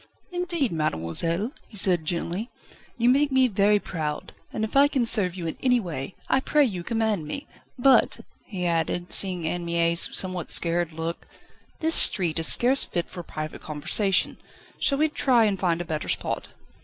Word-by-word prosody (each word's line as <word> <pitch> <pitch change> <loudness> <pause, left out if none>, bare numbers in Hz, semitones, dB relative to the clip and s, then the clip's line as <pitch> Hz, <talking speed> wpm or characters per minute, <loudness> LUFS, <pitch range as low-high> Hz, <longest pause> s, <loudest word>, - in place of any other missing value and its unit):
"Indeed, 345 -7 -1
mademoiselle," 165 - -1 0.2
he 210 - -11
said 180 -4 +3
gently, 175 +6 -3 0.5
"you 235 0 +1
make 280 +3 +3
me 260 -1 +4
very 205 -1 +3
proud; 155 -7 -5 0.2
and 220 0 -2
I 280 +1 +6
can 265 -4 0
serve 200 -6 0
you 175 -3 -6
in 160 - -4
any 250 -2 +3
way, 170 - -6
I 265 - +2
pray 295 +2 +2
you 185 -8 -4
command 220 -6 -1
me. 280 - -5 0.3
But," 270 +1 +3 0.3
he 185 -4 -4
added, 170 +1 -1
seeing 180 -4 0
Anne 175 +2 -2
Mie's 170 0 +2
somewhat 185 -3 -2
scared 170 0 +3
look, 165 +1 -5 0.5
"this 320 +1 +5
street 170 - +3
is 160 - +4
scarce 260 +3 +3
fit 175 -1 -3
for 175 - -7
private 155 -2 -7
conversation. 180 +6 0 0.4
Shall 275 - +1
we 310 +2 +3
try 255 -6 +2
and 200 -3 0
find 175 -2 0
a - - -5
better 155 -2 -4
spot?" - - -2
185 Hz, 170 wpm, -25 LUFS, 170-245 Hz, 0.5 s, I